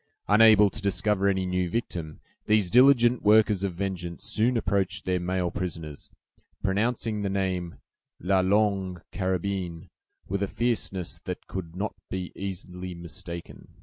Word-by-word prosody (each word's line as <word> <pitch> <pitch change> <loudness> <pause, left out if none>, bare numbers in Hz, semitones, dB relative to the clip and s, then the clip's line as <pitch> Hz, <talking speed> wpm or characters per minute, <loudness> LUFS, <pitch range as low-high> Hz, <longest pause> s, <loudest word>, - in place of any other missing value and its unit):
Unable 105 -1 +6
to 110 - -8
discover 100 0 +1
any 95 -1 +1
new 90 -1 0
victim, 85 -7 -4 0.3
these 105 -4 +3
diligent 125 -2 +6
workers 105 -2 +4
of 95 -3 -2
vengeance 90 -2 -4
soon 120 +3 +1
approached 100 -3 0
their 90 -1 +1
male 90 0 -1
prisoners, 80 -5 -5 0.5
pronouncing 110 +2 0
the 100 - -1
name 95 -3 -2 0.4
"La 95 +2 +2
Longue 95 -2 +1
Carabine," 95 -3 -3 0.4
with 100 +1 -2
a 100 - +1
fierceness 100 -6 -1
that - - -5
could 85 -3 -6
not 100 +3 -2 0.2
be 95 -1 -4
easily 90 -1 -6
mistaken. 85 0 -8
95 Hz, 135 wpm, -27 LUFS, 90-105 Hz, 0.5 s, Unable